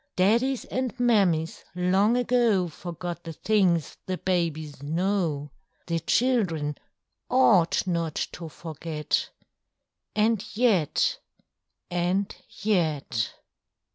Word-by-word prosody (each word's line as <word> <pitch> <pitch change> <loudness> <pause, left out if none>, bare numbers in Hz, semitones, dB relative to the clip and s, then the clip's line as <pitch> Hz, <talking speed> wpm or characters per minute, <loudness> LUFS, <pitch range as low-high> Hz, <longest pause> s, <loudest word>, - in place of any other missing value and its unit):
Daddies 235 +8 +2
and 255 -1 -3
Mammies 195 -10 +2
long 190 +6 +3
ago 235 -7 +2
Forgot 175 +2 -6
the 165 - -6
things 180 -4 +1
the 185 -1 -1
babies 160 -6 -1
know: 160 -2 -1 0.3
The 165 -1 -1
children 165 - +1 0.5
ought 205 -10 +4
not 170 -4 -1 0.2
to 165 -2 -7
forget, 155 -1 -3 0.9
And 215 -1 +2
yet—and 190 - -1 0.3
yet! 155 - 0
180 Hz, 85 wpm, -26 LUFS, 160-215 Hz, 0.9 s, ought